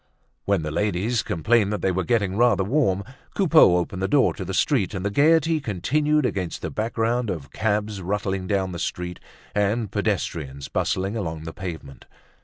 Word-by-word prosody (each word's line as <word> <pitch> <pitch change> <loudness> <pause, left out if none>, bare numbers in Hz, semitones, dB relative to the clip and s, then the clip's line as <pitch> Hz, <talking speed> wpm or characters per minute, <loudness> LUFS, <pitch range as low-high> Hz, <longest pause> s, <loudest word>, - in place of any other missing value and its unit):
When 100 -5 +1
the 75 - -3
ladies 105 +6 0
complained 105 +4 +1
that 105 - -3
they 95 - +2
were 95 +1 -1
getting 100 -1 0
rather 120 -3 +3
warm, 100 -4 +1 0.3
Coupeau 160 - +6
opened 90 +1 -3
the 95 - +1
door 140 +1 +3
to 95 - -6
the 95 - -5
street 105 +1 +1
and 95 +1 -4
the 100 - 0
gaiety 160 +5 +3
continued 145 - +1
against 95 -8 -3
the 80 - -3
background 115 - -1
of 80 -8 -5
cabs 105 -1 -1
rattling 95 0 -2
down 95 -2 0
the 85 - -6
street 90 0 -4 0.3
and 105 +1 0
pedestrians 80 -10 -2
bustling 95 +3 -1
along 80 -7 -4
the 80 0 -7
pavement. 80 -7 -8
100 Hz, 175 wpm, -24 LUFS, 90-115 Hz, 0.3 s, Coupeau